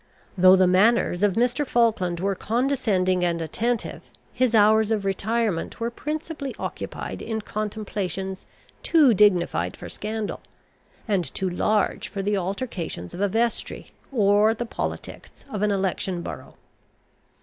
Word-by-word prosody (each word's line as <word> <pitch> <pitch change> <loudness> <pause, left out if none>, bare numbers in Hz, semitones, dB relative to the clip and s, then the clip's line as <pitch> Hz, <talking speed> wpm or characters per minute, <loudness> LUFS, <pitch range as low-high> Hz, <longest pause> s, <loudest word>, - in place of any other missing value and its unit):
Though 185 0 +7
the 185 0 +4
manners 185 0 +3
of 205 -2 +3
Mr. 245 +6 +1
Falkland 220 -10 +1
were 195 +2 0
condescending 210 -6 0
and 170 -1 +1
attentive, 225 +9 -2 0.3
his 245 -2 +2
hours 220 0 +5
of 215 -3 0
retirement 200 -1 -1
were 230 +1 -2
principally 300 +1 -5
occupied - - -5
in 220 -1 -3
contemplations 200 -3 -4 0.3
too 300 -8 +5
dignified 175 - +2
for - - -8
scandal, 215 0 -4 0.7
and 200 -5 +1
too 190 - -1
large 210 +3 0
for 195 -1 -5
the 205 +1 +1
altercations 185 - -4
of 185 - -6
a 205 - +3
vestry, 230 +3 -2 0.2
or 210 -2 +4
the 240 - -3
politics - - -6
of 210 - -3
an 210 - +2
election 190 -2 -1
borough. - - -8
205 Hz, 135 wpm, -24 LUFS, 185-230 Hz, 0.7 s, Though